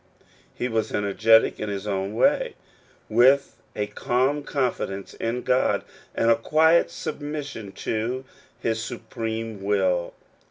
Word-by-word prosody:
He 125 - -2
was 115 -2 -1
energetic 110 +2 +3
in 105 - -3
his 100 0 -4
own 100 0 -2
way, 480 - +2 0.5
with 130 +5 +4 0.2
a 105 - 0
calm 130 +7 0
confidence 125 -9 -2
in 120 +2 -3
God, 125 +1 +2 0.3
and 115 - +3
a - - +6
quiet 160 +8 +4
submis 145 -1 -5
sion 105 -4 -8
to 120 +4 -3 0.3
his 110 -1 -1
supreme 115 -2 -5
will. 95 -3 +1
115 Hz, 125 wpm, -25 LUFS, 105-130 Hz, 0.5 s, a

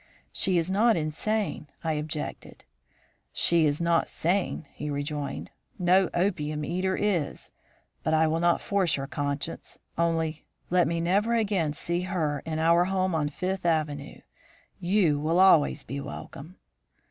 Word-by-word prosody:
"'She 185 -2 +3
is 170 +2 0
not 220 +2 +4
insane,' 160 +3 -2 0.2
I 160 -1 0
objected. 150 0 -5 0.7
"'She 170 -2 +4
is 145 0 0
not 170 -1 +2
sane,' 175 -1 -1
he 150 - -5
rejoined. 145 0 -4 0.3
'No 185 0 +3
opium 155 -5 0
eater 185 +2 -1
is. 180 -8 -1 0.5
But 160 - +1
I 160 0 +4
will 160 +1 +1
not 170 0 +2
force 190 -7 +1
your 135 - -3
conscience; 145 +3 -4 0.2
only 165 -2 0 0.3
let 180 -2 +4
me 165 +1 -1
never 200 +7 +2
again 195 -9 +1
see 170 +3 -1
her 155 -6 -1
in 160 -1 -2
our 170 +2 +4
home 185 -1 0
in 150 -2 0
Fifth 185 +5 -3
Avenue. 155 -4 -1 0.6
You 175 -5 +2
will 160 +4 +1
always 165 -6 +5
be 140 +1 -5
welcome.' 155 +5 -9
165 Hz, 145 wpm, -27 LUFS, 150-185 Hz, 0.7 s, always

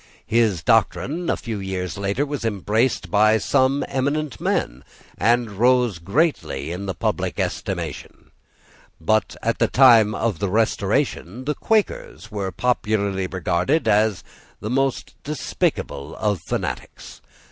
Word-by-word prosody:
His 110 -7 +1
doctrine, 170 +5 +1
a - - +1
few 110 -3 -5
years 90 -3 -4
later, 100 +8 -1
was 145 -3 -4
embraced 110 +3 0
by 110 +1 +5
some 130 +6 +2
eminent 140 -4 -2
men, 60 +2 -1 0.3
and 120 -1 +2
rose 120 -2 +2
greatly 85 - -1
in 95 +3 -5
the 95 - -3
public - - -2
estimation. - - -4 0.7
But 110 +7 +1
at 115 0 0
the - - +3
time 115 -5 +6
of 110 -7 -1
the 100 -1 -1
Restoration 110 - 0
the 150 - 0
Quakers 405 - -1
were 100 -2 -3
popularly 100 -6 0
regarded 95 - 0
as 105 -2 +2 0.4
the 110 - -4
most 135 0 0
despicable 140 - -3
of 105 -5 -1
fanatics. - - -5
110 Hz, 125 wpm, -22 LUFS, 95-130 Hz, 0.7 s, time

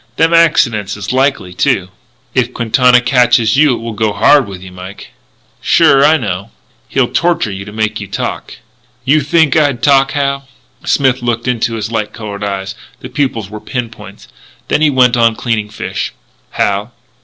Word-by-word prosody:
Them 165 +1 +2
accidents 115 -12 +2
is 100 +4 -4
likely, 130 -9 0
too." 90 0 0 0.4
"If 125 -1 0
Quintana 125 +1 +3
catches 125 -3 +3
you 145 -2 +4
it - - -8
will 115 0 -5
go 110 -1 -1
hard 140 +2 +4
with 95 -2 -9
you, 95 - -10
Mike." 90 +2 -11 0.5
"Sure. 135 0 +4
I 155 +2 +5
know." 100 - -4 0.4
"He'll 130 -3 +1
torture 170 -10 +1
you 95 0 -7
to 105 - -9
make 110 0 -2
you 100 - -7
talk." 100 - -5 0.5
"You 150 +3 +3
think 150 0 +2
I'd 145 -7 +1
talk, 135 0 +3
Hal?" 140 -1 -2 0.4
Smith 130 -2 +1
looked 120 -1 -1
up - - +2
into 115 -2 -1
the 110 +2 -5
light 110 -2 -2
coloured 105 -2 -7
eyes. 95 -1 -4 0.3
The 130 - -8
pupils 125 -7 -2
were 105 0 -8
pin 120 -3 -4
points. - - -13 0.4
Then - - +1
he 155 - +4
went 125 -3 +3
on 115 -1 +3
cleaning 110 -3 -2
fish. 110 - -5 0.4
"Hal?" 100 +3 -1
120 Hz, 180 wpm, -14 LUFS, 105-135 Hz, 0.5 s, I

